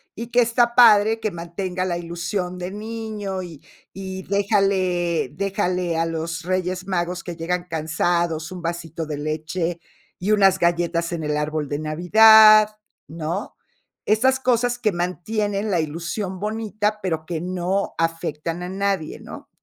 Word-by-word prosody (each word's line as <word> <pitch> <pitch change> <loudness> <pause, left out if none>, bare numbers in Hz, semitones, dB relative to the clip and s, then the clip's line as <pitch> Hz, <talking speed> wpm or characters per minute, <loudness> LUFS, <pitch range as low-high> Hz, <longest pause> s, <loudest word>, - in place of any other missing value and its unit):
y 230 +1 -6
que 245 +1 +4
está 235 +1 +2
padre 220 -2 +6
que 215 - -1
mantenga 180 +2 -4
la 175 -2 -1
ilusión 175 +2 -4
de 180 +1 -5
niño, 210 -3 -5
y 165 -5 -11 0.3
y 190 -1 -6
déjale 195 -4 +1
déjale 185 -4 -1
a 165 - +1
los 165 0 -3
Reyes 185 0 -2
Magos 180 -1 -2
que 175 -2 -6
llegan 175 +2 -2
cansados, 160 +1 -1
un 180 -1 -7
vasito 165 -1 -4
de 150 -1 -5
leche 160 +3 -3 0.4
y 200 +4 -1
unas 195 -2 +4
galletas 170 0 0
en 160 -2 -3
el 150 0 -1
árbol 150 -1 -2
de 145 +1 -2
Navidad, 215 +6 +7 0.3
¿no? 165 - -5 0.5
Esas 260 +5 +3
cosas 245 -1 +1
que 215 -4 +1
mantienen 200 +4 -2
la 175 - +2
ilusión 170 +5 -4
bonita, 215 0 -2
pero 160 -4 -2
que 165 -2 -3
no 185 +2 -2
afectan 165 +1 -2
a 180 - -5
nadie, 195 -4 -2
¿no? - - -11
180 Hz, 145 wpm, -22 LUFS, 170-205 Hz, 0.5 s, Navidad